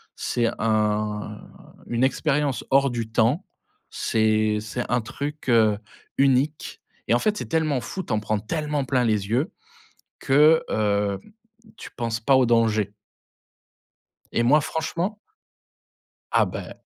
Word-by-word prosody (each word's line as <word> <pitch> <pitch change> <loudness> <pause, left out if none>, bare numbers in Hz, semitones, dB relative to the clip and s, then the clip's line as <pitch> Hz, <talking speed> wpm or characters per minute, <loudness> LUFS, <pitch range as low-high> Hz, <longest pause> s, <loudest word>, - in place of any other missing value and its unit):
c'est 120 -1 -1
un 105 -1 0 0.5
une 120 +1 0
expérience 140 -1 0
hors 135 +1 +4
du 115 -2 -4
temps. 115 - +1 0.4
C'est 110 -1 +1
c'est 110 +3 -4
un 125 - +3
truc, 140 +5 -6
heu, 110 -3 +4 0.4
unique 135 +2 +1 0.3
et - - +3
en 120 - +4
fait, 210 - 0
c'est - - -4
tellement 155 -4 0
fou, 190 - -5
tu - - -8
en 110 - +2
prends 105 0 -1
tellement 150 +5 -2
plein 125 -1 +1
les 105 -3 0
yeux 130 - 0 0.7
que, 150 +3 +5
hem, 100 -2 0 0.6
tu - - -9
penses 115 -2 -3
pas 135 +4 +4
au 130 -1 +5
danger. 110 -3 +2 1.4
Et 120 - +1
moi 145 +6 +5
franchement 170 +7 -3 1.1
Ah - - +4
beh - - -7
120 Hz, 135 wpm, -24 LUFS, 110-145 Hz, 1.4 s, que